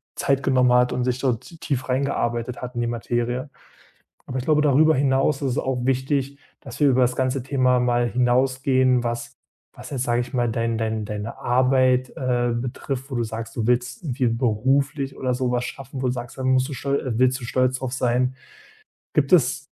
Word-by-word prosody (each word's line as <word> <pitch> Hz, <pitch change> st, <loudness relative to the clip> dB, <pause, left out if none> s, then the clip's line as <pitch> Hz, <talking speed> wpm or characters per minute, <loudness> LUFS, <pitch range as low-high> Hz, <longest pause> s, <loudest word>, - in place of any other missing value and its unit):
Zeit 135 Hz, -1 st, 0 dB
genommen 130 Hz, -2 st, +3 dB
hat 125 Hz, 0 st, +3 dB
und 125 Hz, -, -1 dB
sich 125 Hz, 0 st, -1 dB
dort 125 Hz, -3 st, 0 dB
t 165 Hz, -, -14 dB
tief 135 Hz, -5 st, -3 dB
reingearbeitet 125 Hz, -3 st, -1 dB
hat 125 Hz, 0 st, -7 dB
in 120 Hz, -, -1 dB
die 120 Hz, -, 0 dB
Materie. 120 Hz, +3 st, -2 dB, 0.8 s
Aber 130 Hz, -, -4 dB
ich 125 Hz, -, -3 dB
glaube, 150 Hz, 0 st, +3 dB
darüber 155 Hz, +2 st, +4 dB
hinaus 135 Hz, +1 st, +2 dB
ist 135 Hz, -2 st, 0 dB
es -, -, -2 dB
auch 130 Hz, -1 st, -1 dB
wichtig, 135 Hz, +1 st, 0 dB, 0.2 s
dass 135 Hz, 0 st, -10 dB
wir 145 Hz, -, +5 dB
über 130 Hz, -1 st, +3 dB
das 125 Hz, 0 st, +2 dB
ganze 130 Hz, 0 st, 0 dB
Thema 130 Hz, -2 st, +2 dB
mal 120 Hz, -1 st, +1 dB
hinausgehen, 130 Hz, +1 st, +2 dB
was 120 Hz, 0 st, -3 dB, 0.4 s
was -, -, -11 dB
jetzt 130 Hz, -3 st, -2 dB
sage 120 Hz, -1 st, +1 dB
ich 120 Hz, -, -10 dB
mal, 120 Hz, -2 st, +1 dB
dein 115 Hz, 0 st, -1 dB
dein 110 Hz, -1 st, -2 dB
deine 105 Hz, +2 st, -5 dB
Arbeit, 130 Hz, 0 st, +2 dB
äh, 120 Hz, -2 st, 0 dB
betrifft 130 Hz, +2 st, -4 dB
wo -, -, -4 dB
du 120 Hz, -, 0 dB
sagst, 110 Hz, +1 st, -6 dB
du 110 Hz, -, -1 dB
willst 125 Hz, +5 st, 0 dB
irgendwie 130 Hz, -5 st, -1 dB
beruflich 135 Hz, +5 st, 0 dB
oder 130 Hz, -1 st, -1 dB
so 125 Hz, 0 st, -1 dB
was 125 Hz, 0 st, 0 dB
schaffen 135 Hz, +1 st, -7 dB
wo 130 Hz, -, 0 dB
du 125 Hz, -, +1 dB
sagst, 120 Hz, +1 st, -7 dB
dann 130 Hz, 0 st, -1 dB
musst 130 Hz, +1 st, +3 dB
du -, -, -7 dB
stol 140 Hz, +3 st, -1 dB
äh, 125 Hz, -4 st, -3 dB
willst 130 Hz, +1 st, +3 dB
du -, -, -7 dB
stolz 130 Hz, +1 st, +1 dB
drauf 130 Hz, -2 st, -4 dB
sein. 125 Hz, 0 st, +1 dB, 0.8 s
Gibt -, -, +1 dB
es -, -, +2 dB
125 Hz, 205 wpm, -23 LUFS, 120-135 Hz, 0.8 s, wir